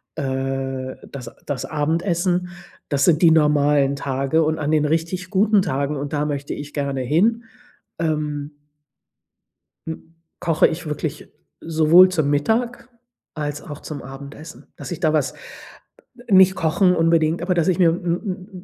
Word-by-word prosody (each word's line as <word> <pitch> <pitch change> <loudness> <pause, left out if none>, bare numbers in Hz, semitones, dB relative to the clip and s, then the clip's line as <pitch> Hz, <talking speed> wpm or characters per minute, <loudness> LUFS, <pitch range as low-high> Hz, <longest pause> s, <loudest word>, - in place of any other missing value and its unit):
äh, 135 -2 -3 0.2
das 125 -4 -7 0.2
das 140 -4 -3
Abendessen. 175 +4 0 0.4
Das 140 -1 +2
sind 165 -3 +3
die 170 -2 +6
normalen 145 -2 +3
Tage 140 +3 0
und 155 +1 0
an 150 0 -1
den 155 -1 +2
richtig 165 +4 -2
guten 205 +1 +3
Tagen 145 -4 -1
und 140 +1 -5
da 150 0 0
möchte 140 -1 -3
ich 145 0 -8
gerne 140 -2 -2
hin, 205 - +1 0.6
ähm 150 -2 -2 1.3
m 160 0 -8 0.3
koche 165 -3 +3
ich 165 +2 -5
wirklich 150 0 -5 0.3
sowohl 165 +3 +5
zum 155 -6 0
Mittag 225 +14 0 0.4
als 150 -1 -4
auch 145 -1 -9
zum 145 -3 -7
Abendessen, 140 +4 -11
dass - - -9
ich 175 - -4
da 155 -3 +1
was 150 -4 0 1.0
nicht 190 -1 +6
kochen 180 +3 +2
unbedingt, 165 0 +2
aber 180 +1 0
dass 170 -2 +1
ich 180 - 0
mir 170 -3 +5
'n 180 +3 -3
155 Hz, 145 wpm, -21 LUFS, 145-175 Hz, 1.3 s, die